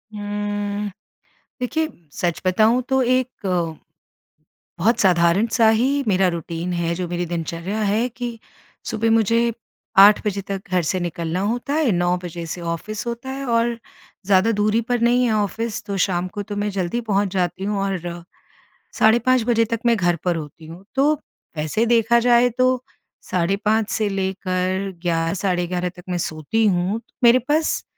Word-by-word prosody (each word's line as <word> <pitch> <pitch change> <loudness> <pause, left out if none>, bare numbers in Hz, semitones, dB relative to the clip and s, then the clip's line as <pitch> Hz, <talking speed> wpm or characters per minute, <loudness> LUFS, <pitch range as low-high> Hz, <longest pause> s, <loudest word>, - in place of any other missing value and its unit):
हुँ, 205 0 -3 0.7
देखिए 315 +6 -1 0.2
सच 175 -4 -2
बताऊँ 220 +7 +3
तो 265 0 +2
एक, 255 +1 +2 1.5
बहुत 225 +8 +2
साधारण 180 +2 +4
सा 225 -3 +4
ही 260 +6 +2
मेरा 190 -1 +3
रूटीन 170 +1 -4
है, 170 -1 -1
जो 180 +1 -3
मेरी 175 0 -2
दिनचर्या 170 +4 -4
है 215 +4 +1
कि 240 -1 -6 0.5
सुबह 225 0 0
मुझे 230 +1 +3 0.5
8 200 +2 +8
बजे 200 -1 -1
तक 195 -1 -5
घर 180 -1 +2
से 185 +4 -1
निकलना 170 0 -3
होता 240 +7 -1
है। 305 -7 +2
9 175 0 +1
बजे 170 0 -6
से 175 - -5
ऑफ़िस 170 +7 -4
होता 235 +3 -5
है, 275 +1 -5
और 235 0 +1 0.5
ज़्यादा 200 +3 +4
दूरी 210 +2 +2
पर 245 -1 +1
नहीं 245 +2 +3
है 235 - +1
ऑफ़िस, 215 +2 -2
तो 200 -2 -4
शाम 180 -1 0
को 205 - -3
तो 205 0 -7
मैं 205 0 -1
जल्दी 190 +3 -2
पहुँच 205 -3 0
जाती 185 +1 -1
हूँ। 205 0 -1
और 175 -3 -4 0.8
साढ़े 220 +2 +6
5 255 0 +2
बजे 230 -1 +3
तक 230 +1 -3
मैं 235 -1 +4
घर 175 -3 +2
पर 175 -1 +2
होती 155 0 -8
हूँ। 170 +4 -11
तो 285 +3 +4 0.4
वैसे 155 +9 0
देखा 235 0 +4
जाए 240 0 +4
तो 255 0 +2 0.5
साढ़े 180 +2 +1
5 220 0 +2
से 215 - 0
लेकर 190 0 -2
11 165 -1 0
साढ़े 180 -2 0
11 180 0 -2
तक 180 - -13
मैं 180 - -1
सोती 160 +8 -1
हूँ। 185 +4 0 0.2
मेरे 240 +2 +7
पास 300 +5 0
205 Hz, 165 wpm, -21 LUFS, 180-230 Hz, 1.5 s, 8